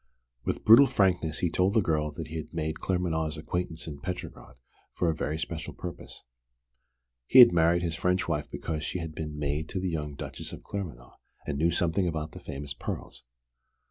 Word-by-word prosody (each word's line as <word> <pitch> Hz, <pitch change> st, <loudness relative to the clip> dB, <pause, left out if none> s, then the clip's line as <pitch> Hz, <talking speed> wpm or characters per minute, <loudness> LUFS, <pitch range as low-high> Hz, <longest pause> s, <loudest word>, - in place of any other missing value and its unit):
With -, -, -2 dB
brutal 115 Hz, +6 st, +9 dB
frankness 85 Hz, -, +1 dB
he 85 Hz, -, 0 dB
told 95 Hz, +5 st, +2 dB
the 110 Hz, -, +5 dB
girl 75 Hz, -3 st, +1 dB
that 80 Hz, 0 st, -6 dB
he 80 Hz, -, -4 dB
had 80 Hz, -, -7 dB
made 80 Hz, -1 st, -2 dB
Claremanagh's 80 Hz, -4 st, -1 dB
acquaintance 80 Hz, +1 st, -2 dB
in 75 Hz, -3 st, -7 dB
Petrograd 90 Hz, -3 st, -6 dB, 0.4 s
for 85 Hz, -2 st, +2 dB
a -, -, -4 dB
very 75 Hz, 0 st, -2 dB
special 80 Hz, 0 st, -5 dB
purpose. 90 Hz, -1 st, -8 dB, 1.0 s
He -, -, +4 dB
had 125 Hz, -6 st, +11 dB
married 85 Hz, +1 st, +3 dB
his 85 Hz, -2 st, -1 dB
French 90 Hz, +2 st, +1 dB
wife 75 Hz, -3 st, -1 dB
because 80 Hz, -1 st, -4 dB
she -, -, -2 dB
had 85 Hz, -3 st, -5 dB
been 75 Hz, -1 st, -5 dB
maid 75 Hz, +2 st, -2 dB
to 95 Hz, -, -3 dB
the 90 Hz, -1 st, -1 dB
young 75 Hz, -3 st, -3 dB
Duchess -, -, -6 dB
of -, -, -9 dB
Claremanagh, 80 Hz, -12 st, -7 dB, 0.3 s
and 70 Hz, -2 st, -3 dB
knew 85 Hz, +2 st, +3 dB
something 85 Hz, +2 st, +1 dB
about 80 Hz, -2 st, -3 dB
the -, -, -10 dB
famous 70 Hz, +1 st, -6 dB
pearls. -, -, -6 dB
80 Hz, 190 wpm, -28 LUFS, 75-90 Hz, 1.0 s, had